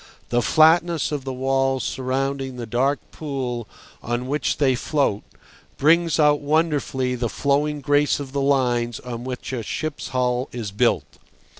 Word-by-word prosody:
The 120 0 +2
flatness 160 +3 +4
of 145 -3 -3
the 135 - -3
walls 135 0 0
surrounding 135 0 -2
the 120 -1 -5
dark 130 +5 +1
pool 130 -6 -4 0.3
on 120 +1 -2
which 145 +3 -1
they 135 -3 +3
float 130 -5 0 0.6
brings 165 +2 +3
out 150 -1 +5
wonderfully 145 -4 0
the 120 -2 -2
flowing 145 +3 0
grace 145 +2 +2
of 140 -2 -6
the 140 0 -1
lines 125 -4 +1
on 120 -1 -6
which 130 0 -5
a 125 - -2
ship's 155 +7 -4
hull 125 0 0
is 115 -4 -5
built. 100 - +2
135 Hz, 150 wpm, -23 LUFS, 125-145 Hz, 0.6 s, out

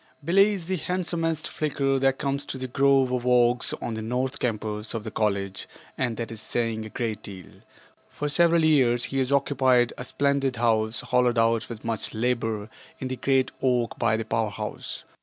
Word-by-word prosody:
Billie 195 +5 +5
is 180 -4 -7
the 185 +2 -1
handsomest 165 -2 -2
Flicker 135 -3 0
that 135 0 +2
comes 140 0 -1
to - - -5
the 130 - -4
grove 135 0 +3
of 125 -1 -1
oaks 120 -1 +3
on 115 - -4
the 110 - -4
north 125 +4 -2
campus 110 -2 -2
of 110 - -3
the 110 - -6
college 100 -3 -1 0.3
and 120 -4 -2
that 115 -1 -4
is 110 -1 -6
saying 115 -2 -1
a 110 - -8
great 110 -1 -3
deal. 95 -3 -9 0.6
For 150 - -4
several 170 +2 +4
years 125 -6 +4
he 135 - -1
has 130 0 0
occupied 130 -3 +3
a - - -4
splendid 140 0 0
house 110 -1 +1
hollowed 125 -1 +2
out 115 0 +2
with 115 -2 -8
much 115 -1 -2
labor 115 -2 -1 0.3
in 130 - -5
the 130 - -2
great 130 0 +1
oak 125 -3 0
by 115 -2 +2
the 115 - -3
power 110 0 0
house. 100 - -6
125 Hz, 190 wpm, -26 LUFS, 115-140 Hz, 0.6 s, Billie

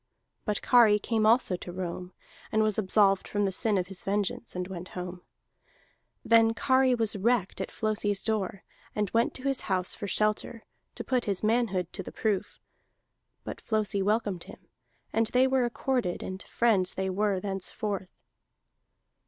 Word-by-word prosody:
But 210 -4 -1
Kari 230 -4 +6
came 215 +1 +1
also 225 -4 +4
to 175 - -8
Rome, 180 0 -5 0.4
and 220 0 +3
was 215 -1 +1
absolved 195 -1 +3
from 205 0 0
the 195 - 0
sin 210 +2 +1
of 180 - 0
his 190 -1 -6
vengeance, 205 +4 -2
and 180 0 -3
went 185 -1 -7
home. 180 0 -5 1.0
Then 225 0 +5
Kari 260 -1 +3
was 225 -2 +1
wrecked 210 -1 0
at - - -3
Flosi's 210 -2 -1
door, 200 -3 -2 0.3
and 210 -3 -1
went 230 +1 +1
to 260 - -3
his 275 -1 +2
house 185 -2 -1
for 200 - -5
shelter, 215 +3 -1 0.3
to - - -5
put 255 -2 0
his 200 -2 -1
manhood 215 -6 +1
to - - -4
the - - -8
proof. 210 -4 -2 0.8
But - - -7
Flosi 215 -3 0
welcomed 205 -3 0
him, - - -14 0.5
and 225 0 +2
they 250 +3 +3
were 265 -1 +2
accorded; 240 -5 -1
and 190 +1 -6
friends 205 -6 +1
they 190 0 -1
were 200 0 +1
thenceforth. 195 0 -3
210 Hz, 160 wpm, -28 LUFS, 190-230 Hz, 1.0 s, Kari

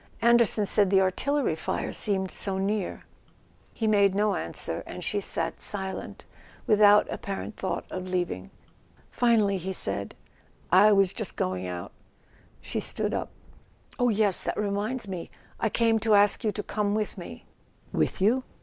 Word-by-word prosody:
Anderson 235 -3 +4
said 200 -1 +3
the 195 0 +5
artillery 230 - +1
fire 160 - -3
seemed 190 -3 0
so 195 -2 -2
near." 200 0 -2 0.7
He 225 - -3
made 200 -3 +4
no 205 0 +2
answer, - - -3
and - - -7
she - - -1
sat - - -3
silent, 190 -2 -6 0.4
without 210 -1 +6
ap¬ - - -5
parent 200 +2 -5
thought 190 - -3
of 185 0 -5
leaving. 175 - -2 0.6
Finally 220 -5 +3
he 190 +2 -4
said: 100 - -3 0.6
"I 200 +4 +7
was 195 -2 +4
just 220 -6 -4
going 90 0 -2
out 90 -1 -6 0.4
" - - -35 0.3
She - - -4
stood - - -2
up. - - -2 0.7
"Oh, 245 0 +3
yes—that 210 -3 +1
reminds 210 +3 -2
me. 185 -3 -6 0.3
I 225 - +1
came 225 0 +2
to 220 -1 +3
ask 205 0 +4
you 215 - +1
to 210 - -5
come 210 -1 -1
with 215 -1 -2
me." - - -9 0.5
"With - - 0
you 230 +7 +3
205 Hz, 160 wpm, -27 LUFS, 190-215 Hz, 0.7 s, I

